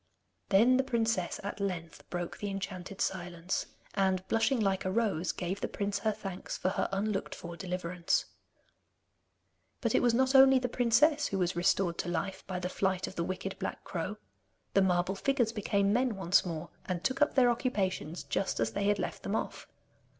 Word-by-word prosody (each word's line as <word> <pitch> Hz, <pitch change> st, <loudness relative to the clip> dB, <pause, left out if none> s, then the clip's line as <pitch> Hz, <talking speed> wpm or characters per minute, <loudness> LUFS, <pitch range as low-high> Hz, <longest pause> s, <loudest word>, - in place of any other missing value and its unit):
Then 230 Hz, +6 st, +6 dB
the 265 Hz, -, +3 dB
princess 230 Hz, -7 st, 0 dB
at 200 Hz, +1 st, -5 dB
length 180 Hz, -4 st, -4 dB
broke 175 Hz, -1 st, -4 dB
the 205 Hz, -, -3 dB
enchanted 195 Hz, 0 st, -5 dB
silence, 180 Hz, -1 st, -2 dB, 0.3 s
and 190 Hz, -2 st, +1 dB
blushing 230 Hz, +3 st, +2 dB
like 195 Hz, -3 st, +1 dB
a 185 Hz, -, -1 dB
rose, 190 Hz, -5 st, +1 dB
gave 185 Hz, +2 st, -4 dB
the -, -, 0 dB
prince 200 Hz, 0 st, -2 dB
her 220 Hz, -, +1 dB
thanks 195 Hz, -3 st, -6 dB
for 185 Hz, -, 0 dB
her 195 Hz, -, -1 dB
unlooked 195 Hz, +1 st, -1 dB
for 170 Hz, 0 st, -8 dB
deliverance. 180 Hz, -1 st, -1 dB, 1.5 s
But -, -, 0 dB
it -, -, +4 dB
was 240 Hz, -2 st, +3 dB
not 260 Hz, +2 st, +3 dB
only 270 Hz, 0 st, +8 dB
the 250 Hz, -1 st, 0 dB
princess 250 Hz, +6 st, +3 dB
who 195 Hz, -, -2 dB
was 180 Hz, -1 st, 0 dB
restored 175 Hz, 0 st, +1 dB
to 175 Hz, -, -2 dB
life 190 Hz, +2 st, -2 dB
by 185 Hz, -1 st, -3 dB
the 180 Hz, 0 st, -2 dB
flight 190 Hz, 0 st, 0 dB
of -, -, -7 dB
the 170 Hz, -, -2 dB
wicked 185 Hz, +2 st, -4 dB
black -, -, -4 dB
crow. -, -, -4 dB, 0.6 s
The 195 Hz, -, +5 dB
marble 180 Hz, 0 st, +2 dB
figures 240 Hz, +2 st, +1 dB
became 200 Hz, -2 st, +1 dB
men 250 Hz, -1 st, +2 dB
once 185 Hz, -2 st, +3 dB
more, 160 Hz, -3 st, -5 dB, 0.2 s
and 180 Hz, -2 st, -2 dB
took 260 Hz, +3 st, -1 dB
up 295 Hz, -, +3 dB
their 250 Hz, -3 st, +6 dB
occupations 190 Hz, -, -1 dB
just 195 Hz, -, -1 dB
as -, -, +1 dB
they 200 Hz, 0 st, -1 dB
had 205 Hz, 0 st, +3 dB
left -, -, -4 dB
them -, -, -2 dB
off. -, -, -4 dB
195 Hz, 185 wpm, -31 LUFS, 180-225 Hz, 1.5 s, only